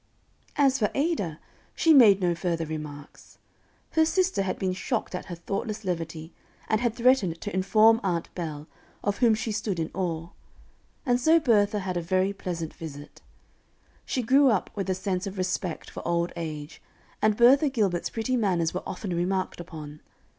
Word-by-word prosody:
As 275 -1 +3
for 210 - +2
Ada, 275 - -1 0.4
she 325 - +4
made 210 -8 +7
no 175 -1 +2
further 170 -1 -2
remarks. 150 -2 -8 0.5
Her 320 - +4
sister 365 - +1
had 190 -1 -2
been 185 -1 -1
shocked 220 +5 -3
at 180 - -4
her 175 - -6
thoughtless 200 +5 -4
levity, 165 -2 -4 0.3
and 220 0 +1
had 240 -2 0
threatened 235 -9 +2
to 205 - -5
inform 215 +4 +4
Aunt 175 -4 -2
Bell, 155 -4 -5 0.4
of 205 0 -1
whom 235 -4 +5
she 220 +1 -3
stood 210 -3 -2
in 160 - -2
awe; 170 -2 -3 0.8
and 245 -1 +2
so 320 +5 +5
Bertha 210 -7 +3
had 185 -2 -3
a - - -1
very 185 +3 +1
pleasant 170 -5 -5
visit. 145 -2 -10 0.8
She 255 - -2
grew 270 +4 +5
up 215 -6 0
with 195 -2 -4
a 185 - +1
sense 190 0 -2
of 195 0 -7
respect 180 -2 -3
for - - -7
old 170 0 0
age; 155 -2 -6 0.4
and 215 -1 +3
Bertha 270 +5 +6
Gilbert's 205 -9 0
pretty 235 +3 -1
manners 180 -8 +1
were 185 - -3
often 185 -2 -4
remarked 185 +2 -1
upon. 155 -3 -9
190 Hz, 170 wpm, -26 LUFS, 170-225 Hz, 0.8 s, made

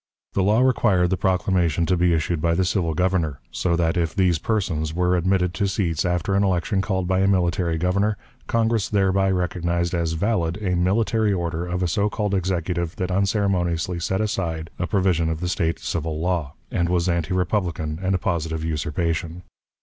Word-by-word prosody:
The 100 - +1
law 105 +5 +3
required 105 -9 +3
the - - +3
proclamation 90 -3 +1
to 90 - +2
be 90 0 +2
issued 80 0 -1
by 85 0 +2
the 95 +1 +1
civil 90 -4 0
Governor; 85 -5 0
so 85 -2 0
that, 85 +1 +1
if 85 0 -1
these 90 -5 +2
persons 80 -7 -1
were 90 0 +2
admitted 90 0 +1
to 100 0 0
seats 90 -5 -1
after 90 +2 0
an 100 +1 +3
election 95 +1 +1
called 95 -3 -1
by 95 0 +1
a 95 - +3
military 90 -3 +1
Governor, 100 +5 +1 0.3
Congress 115 -2 +1
thereby 95 -1 +2
recognized 85 -1 -1
as 85 -2 0
valid 90 -2 0
a 95 -4 -1
military 105 +4 +2
order 85 -1 -2
of 90 +1 -2
a - - +1
so 100 +5 +1
called 105 -1 -2
Executive 90 -2 -1
that 90 0 -3
unceremoniously 90 -3 0
set 95 +4 -1
aside 85 -6 -2
a 90 - -1
provision 90 -3 +1
of 80 -1 -2
the 90 - -2
State 85 -2 0
civil 80 -2 -3
law, 85 -4 -1 0.2
and 85 -2 0
was 90 0 +1
anti 85 0 0
republican 90 -4 -1
and 95 0 +1
a - - +2
positive 80 -2 -2
usurpation. 80 +2 -2
90 Hz, 185 wpm, -23 LUFS, 85-95 Hz, 0.3 s, law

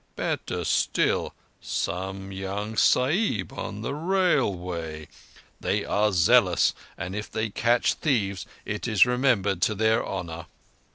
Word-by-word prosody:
Better - - -2
still, - - +1 0.3
some 95 +3 -3
young 100 +3 -4
Sahib 130 - +2
on 105 - -5
the 140 - -2
Railway! 95 - 0 0.5
They - - -1
are 105 +1 +2
zealous, 85 -3 +4 0.2
and 95 +3 -5
if 105 +1 -5
they 110 -1 -2
catch 120 +3 +2
thieves 105 - -1 0.2
it 105 +3 -3
is 110 -2 +5
remembered 125 -7 +1
to 110 - +2
their 110 +2 +2
honour." 85 -3 -5
105 Hz, 120 wpm, -26 LUFS, 95-120 Hz, 0.5 s, is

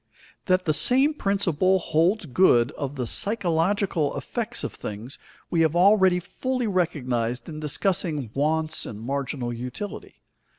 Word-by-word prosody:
That 185 -1 +2
the 155 - +2
same 265 - +4
principle 190 - +1
holds 175 +4 +1
good 125 -5 +3
of 140 -1 -5
the 125 -3 -3
psychological 185 - 0
effects - - -3
of - - -4
things, 110 +6 -7 0.3
we 170 - +2
have 160 0 +2
already 190 0 +5
fully 255 +7 -3
recognized 130 - -1
in 155 -2 -7
discussing 150 - -1
wants 155 +2 0
and 105 - -7
marginal 130 0 -3
utility. 125 - -7
160 Hz, 130 wpm, -25 LUFS, 135-190 Hz, 0.3 s, already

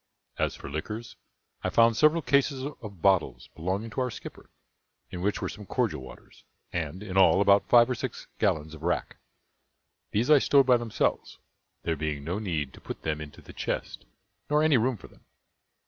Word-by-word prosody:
As - - 0
for - - -10
liquors, 105 +11 -5 0.5
I - - 0
found 115 0 +4
several 155 +5 +4
cases 140 -1 +2
of 110 - -9
bottles 95 -4 +2
belonging 95 +7 -3
to 130 - -2
our 125 - 0
skipper, - - -10 0.6
in 90 - -5
which 100 +2 -1
were - - 0
some 105 -1 -9
cordial - - -1
waters; 65 -1 -14 0.3
and, 85 +3 -3
in 95 -2 -4
all, 95 - +6
about 100 0 +4
five 120 -1 +7
or 130 - 0
six 120 - -5
gallons 80 0 0
of 80 - -11
rack. 90 +2 -2 0.9
These 120 +8 +1
I 150 - +8
stowed 140 0 +4
by 125 -1 +5
themselves, 120 -2 -1 0.5
there 80 - 0
being 75 -1 -3
no 90 +7 -2
need 80 -10 -2
to - - -14
put - - -8
them 75 -1 -2
into 75 -1 -10
the - - -12
chest, - - -4 0.4
nor 150 +1 +3
any 155 -2 +4
room 125 +1 0
for - - -13
them. - - -23
100 Hz, 185 wpm, -28 LUFS, 80-125 Hz, 0.9 s, I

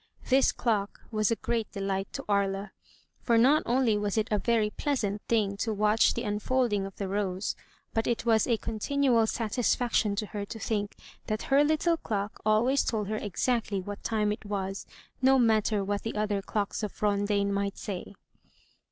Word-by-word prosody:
This 265 +1 +5
clock 210 -4 -1
was 215 -2 +1
a 230 - +2
great 225 -1 -2
delight 195 -1 -2
to - - -5
Aria; 200 -1 0 0.5
for 235 -2 +2
not 275 +7 +5
only 235 -4 +2
was 205 0 -1
it 220 0 +1
a 210 - +2
very 220 -2 +1
pleasant 210 -9 -1
thing 210 -4 +1
to 220 +2 -1
watch 210 +1 +3
the 235 - -2
unfolding 210 -1 0
of 195 - -12
the 200 - -4
rose, 195 -1 -2 0.4
but 225 0 0
it 235 -1 -1
was 225 -2 +3
a 235 -3 +2
continual 230 +1 +1
satisfaction 230 -1 +1
to 215 - -2
her 205 -1 -5
to 215 +3 -7
think 210 -2 -2 0.3
that 215 0 -2
her 280 +2 +6
little 315 +3 +2
clock 205 -6 -3
always 230 +6 +3
told 210 -3 -2
her 215 - -1
exactly 215 0 -1
what 200 +2 -7
time 210 -2 +1
it 210 - -5
was, 195 -2 -4 0.3
no 265 +1 +5
matter 220 -3 +2
what 200 +1 -2
the 225 - -4
other 210 -1 0
clocks 205 +1 -2
of 210 -2 -5
Rondaine 200 0 +1
might 200 0 -1
say. 200 -1 -6
215 Hz, 180 wpm, -28 LUFS, 200-230 Hz, 0.5 s, her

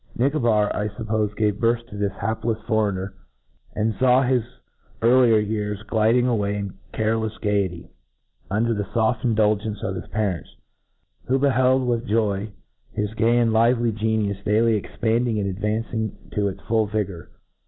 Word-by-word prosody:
Nicobar, 120 -6 +2
I 105 - -1
fup^ 105 +1 -7
pofe, 105 -1 -1
gave 105 -2 +1
birth 115 0 +1
to 110 - -12
this 100 -1 -1
haplefs 110 +2 -2
foreigner, 100 -3 0 0.6
and 110 0 0
faw 130 0 +4
his 130 -1 +2 0.6
earlier 120 -1 +5
years 105 -1 -2
gliding 110 +3 +2
away 105 -5 0
in 100 -2 -4 0.2
carelefs 110 0 -1
gayety, 100 -5 -1 0.6
under 115 +4 +1
the 105 -2 -1
foft 110 +3 0
indulgence 110 -2 +1
of 95 - -2 0.2
parents, 100 -5 -2 0.7
who 130 - +2
beheld 130 -1 +3
with 120 0 -1
joy 105 -1 0 0.4
his 105 0 -2
gay 115 +2 +2
and 120 -1 +3
Kvely 115 +1 +3
geniufe 105 -2 -1
daily 110 +3 +3
expand 115 +3 0
ing 110 -2 0
and 100 - -1
advancing 110 +3 -2
to 105 -1 0
its 95 0 -5
full 110 -1 +1
vigour. 100 -5 -3
110 Hz, 150 wpm, -23 LUFS, 105-115 Hz, 0.7 s, earlier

